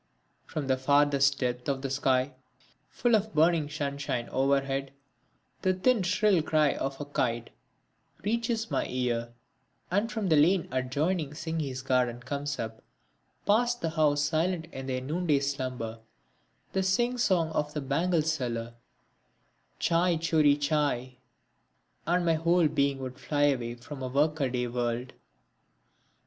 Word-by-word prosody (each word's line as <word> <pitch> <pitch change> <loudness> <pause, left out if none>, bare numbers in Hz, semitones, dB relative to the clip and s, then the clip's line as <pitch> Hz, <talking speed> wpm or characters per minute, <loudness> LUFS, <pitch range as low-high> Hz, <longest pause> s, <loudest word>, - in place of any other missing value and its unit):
From 150 - -3
the 130 -1 +1
furthest 140 0 +3
depth 125 0 -2
of 135 -1 -2
the 135 - -2
sky 135 0 +1 0.6
full 240 -1 0
of 215 0 -1
burning 160 -1 +3
sunshine 140 -5 -3
overhead 135 0 0 0.7
the 185 0 +2
thin 230 +4 +2
shrill 190 0 +3
cry 155 -2 +2
of 135 0 -4
a 145 - -4
kite 120 -5 -2 0.7
reaches 230 +1 -1
my - - 0
ear; 120 -2 -1 0.6
and 205 +5 +1
from 215 -5 -2
the 160 - +5
lane 165 +4 +4
adjoining 145 +5 -1
Singhi's 150 -5 -3
Garden 125 -3 +1
comes 140 +3 -4
up, 110 0 -5 0.6
past 240 +4 +2
the 165 - -1
houses 150 -2 +2
silent 165 +2 0
in 135 0 -7
their 130 -1 -2
noonday 150 +1 +1
slumber, 130 -5 -3 0.7
the 190 - +1
sing 240 +7 +1
song 175 -8 +2
of 150 -1 -2
the - - 0
bangle 165 +5 +1
seller 120 -7 -2 1.0
chai 170 +1 +2
choori 155 -3 +3
chai... 140 -4 0 0.9
and 175 +1 +2
my 165 - +4
whole 165 +1 +3
being 140 -1 +1
would 130 0 -7
fly 145 +2 0
away 125 -5 +1
from 130 +4 -9
the 130 -1 -4
work 150 +4 +1
a 135 -3 +1
day 125 0 -1
world. 120 +1 -2
145 Hz, 140 wpm, -29 LUFS, 130-165 Hz, 1.0 s, the